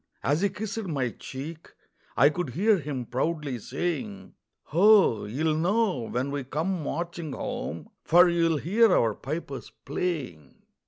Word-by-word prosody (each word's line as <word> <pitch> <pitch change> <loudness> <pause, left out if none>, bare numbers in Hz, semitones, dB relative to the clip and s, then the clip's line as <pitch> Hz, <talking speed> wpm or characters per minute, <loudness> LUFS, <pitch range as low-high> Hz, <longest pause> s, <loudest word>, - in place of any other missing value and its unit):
As 145 +5 +1
he 200 - +3
kissed 220 +3 -4
my 135 -8 -1
cheek, 155 +8 -8 0.5
I 140 +4 +7
could 175 -1 -3
hear 205 +2 +3
him 140 -4 -4
proudly 140 +1 -2
saying: 110 - -4 0.4
"Ho! 190 - +5
you'll 155 +9 0
know 180 - +1
when 130 +3 -2
we 140 -1 -3
come 160 +7 -2
marching 170 -1 -4
home, 80 - -5 0.2
For 175 +2 +6
you'll 165 -2 +2
hear 210 +8 +3
our 115 -2 +2
pipers 140 +2 -6
playing." 140 - -4
155 Hz, 140 wpm, -27 LUFS, 130-175 Hz, 0.5 s, I